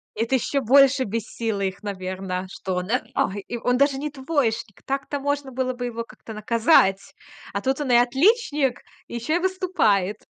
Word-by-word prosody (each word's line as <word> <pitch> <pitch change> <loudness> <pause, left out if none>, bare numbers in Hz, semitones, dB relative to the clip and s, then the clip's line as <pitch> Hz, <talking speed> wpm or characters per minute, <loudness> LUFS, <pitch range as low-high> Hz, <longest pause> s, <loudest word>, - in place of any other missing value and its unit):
Это 230 +4 0
ещё 275 +2 0
больше 270 +2 +5
бесило 225 0 -3
их, 195 +1 -3
наверно, 185 -2 -4
что 190 -1 -4
он, 180 +2 -3
э, 250 - +2
ой, 200 +2 0
и 240 - -4
он 245 +1 +1
даже 280 0 +3
не 295 +2 -3
двоечник. 260 - -2
Так-то 275 +1 -2
можно 285 -1 -2
было 255 0 -1
бы 245 0 -5
его 230 -1 -4
как-то 225 -1 -12
наказать. 215 -3 +2 0.4
А 200 - -2
тут 265 +4 -1
он 260 -4 -1
и - - +6
отличник, 280 - +2 0.3
ещё 240 +8 -1
и - - -1
выступает. 345 - 0
245 Hz, 175 wpm, -24 LUFS, 210-280 Hz, 0.4 s, и